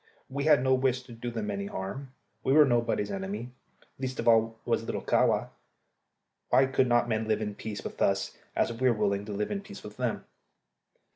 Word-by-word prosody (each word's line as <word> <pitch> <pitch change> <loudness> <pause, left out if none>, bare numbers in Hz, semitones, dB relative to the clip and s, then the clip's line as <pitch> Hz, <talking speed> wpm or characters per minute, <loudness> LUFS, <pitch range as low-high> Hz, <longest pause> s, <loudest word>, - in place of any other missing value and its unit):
We 140 +2 -3
had 150 -4 +5
no 130 0 +3
wish 130 -1 +1
to 125 - -14
do 115 +1 -5
them 110 -3 -3
any 100 0 -3
harm. 115 +9 -5 0.3
We 135 - +2
were 150 0 +8
nobody's 120 -5 +1
enemy; 100 +5 -4 0.5
least 130 -1 -3
of - - -2
all 115 -1 +4
was - - +1
little - - -4
Kahwa. - - +2 1.0
Why 135 - +5
could 130 0 +2
not 120 0 +3
men 110 -1 -1
live 110 -1 +1
in 105 -1 -3
peace 105 0 -6
with - - -7
us 100 0 +1 0.2
as 115 - +1
we 130 +3 +2
were 115 - +1
willing 100 -1 0
to 105 - -6
live 105 +1 -2
in 200 - -2
peace 200 0 -11
with 105 0 -10
them? 125 -3 -2
115 Hz, 205 wpm, -29 LUFS, 105-130 Hz, 1.0 s, were